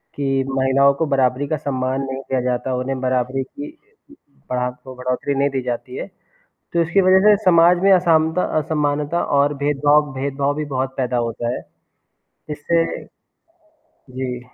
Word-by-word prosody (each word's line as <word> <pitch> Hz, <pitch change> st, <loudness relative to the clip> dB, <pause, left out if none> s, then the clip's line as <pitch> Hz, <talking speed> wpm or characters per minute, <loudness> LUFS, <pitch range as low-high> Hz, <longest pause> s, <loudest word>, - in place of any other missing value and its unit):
कि 135 Hz, -1 st, 0 dB
महिलाओं 135 Hz, +1 st, +3 dB
को 160 Hz, +3 st, -1 dB
बराबरी 135 Hz, -1 st, +1 dB
का 155 Hz, -, -1 dB
सम्मान 130 Hz, -1 st, -2 dB
नहीं 135 Hz, 0 st, -5 dB
दिया 130 Hz, -2 st, -2 dB
जाता, 125 Hz, +1 st, -1 dB
उन्हें 130 Hz, +1 st, -3 dB
बराबरी 130 Hz, +1 st, 0 dB
की 290 Hz, -, -9 dB, 0.8 s
बड़ातो 125 Hz, +1 st, -4 dB
बढ़ोत्तरी 125 Hz, +2 st, -2 dB
नहीं 140 Hz, +1 st, +1 dB
दी 135 Hz, -1 st, -2 dB
जाती 125 Hz, +1 st, -5 dB
है। -, -, -5 dB, 0.7 s
तो 170 Hz, -, +2 dB
इसकी 175 Hz, +4 st, +2 dB
वजह 185 Hz, 0 st, +5 dB
से 210 Hz, -, +7 dB
समाज 175 Hz, 0 st, +6 dB
में 195 Hz, -, +5 dB
असामता 165 Hz, -1 st, +3 dB, 0.2 s
असमानता 150 Hz, +1 st, -1 dB, 0.2 s
और 145 Hz, +1 st, +3 dB
भेदभाव 145 Hz, 0 st, +2 dB
भेदभाव 140 Hz, +1 st, -1 dB
भी 155 Hz, 0 st, -3 dB
बहुत 130 Hz, -1 st, -3 dB
पैदा 125 Hz, -1 st, -1 dB
होता 120 Hz, +1 st, -3 dB
है। -, -, -6 dB, 0.9 s
जिससे 165 Hz, +3 st, 0 dB, 1.0 s
जी। 130 Hz, -, -7 dB
135 Hz, 150 wpm, -20 LUFS, 130-150 Hz, 1.0 s, से